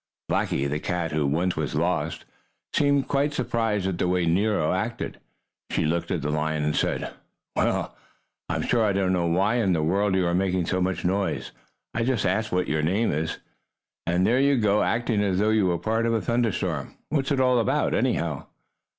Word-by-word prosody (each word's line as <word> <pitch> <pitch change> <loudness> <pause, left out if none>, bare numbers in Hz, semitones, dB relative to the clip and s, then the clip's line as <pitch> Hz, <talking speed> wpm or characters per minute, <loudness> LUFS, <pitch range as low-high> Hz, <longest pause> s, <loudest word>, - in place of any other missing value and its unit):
Blackie, 70 - 0
the 75 +2 -2
cat 85 0 -2
who 75 -2 +1
was 85 +6 0
once - - -2
lost, - - -1 0.5
seemed 140 -2 +2
quite 145 +1 0
surprised 115 -6 0
at 95 -2 -2
the - - +1
way 90 -1 +1
Nero 90 -1 +2
acted. 110 +5 -3 0.5
She - - 0
looked 85 +2 -1
at - - -2
the 75 - -1
lion 75 0 -1
and 75 0 0
said: - - -1 0.4
"Well, - - 0 0.5
I'm - - -1
sure 120 -2 +2
I 105 -2 +2
don't 95 -1 +1
know 85 -2 +1
why 95 +7 +2
in 100 -6 +2
the 80 -2 +1
world 95 +4 +1
you 95 -1 +2
are 85 - +1
making 90 -1 +1
so 95 +2 -1
much 90 0 -1
noise. 95 +2 -1 0.4
I 115 - 0
just 120 -4 0
asked 105 +4 0
what 90 0 0
your 75 0 0
name 95 +9 +1
was, 80 +2 -2 0.7
and 90 +2 +2
there 120 +5 +3
you 140 0 +3
go 105 -2 +3
acting 115 -2 +1
as 95 -3 +1
though 105 +3 +2
you 110 -3 +3
were 90 - +1
a - - -1
part 110 +6 0
of 115 - +1
a - - +2
thunderstorm. 100 - -1
What's 140 -2 0
it 140 - +2
all 125 -1 +4
about, 115 - +1
anyhow?" - - 0
95 Hz, 200 wpm, -25 LUFS, 85-115 Hz, 0.7 s, all